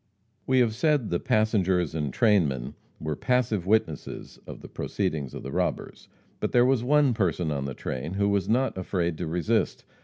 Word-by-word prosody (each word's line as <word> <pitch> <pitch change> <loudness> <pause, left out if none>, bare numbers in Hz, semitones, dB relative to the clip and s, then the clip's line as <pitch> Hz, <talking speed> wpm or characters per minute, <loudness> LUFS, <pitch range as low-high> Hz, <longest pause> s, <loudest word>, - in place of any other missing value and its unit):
We 130 -1 +4
have 115 -3 +2
said 135 - +1
the 85 - +1
passengers 95 -6 +1
and 75 -4 -2
trainmen 80 - +2 0.3
were 80 -1 -3
passive 115 - 0
witnesses 100 -8 -1
of - - -9
the - - -10
proceedings 70 -5 -3
of - - -7
the 65 - -6
robbers. - - -3 0.3
But - - -2
there 120 0 +5
was 130 -2 +2
one 145 0 +4
person 90 -6 0
on 70 -2 -2
the 70 -2 -5
train 70 +9 -4
who 100 0 +2
was 100 -2 0
not 130 +4 +1
afraid 85 -2 -1
to - - -3
resist. 85 -1 0
95 Hz, 180 wpm, -26 LUFS, 80-120 Hz, 0.3 s, there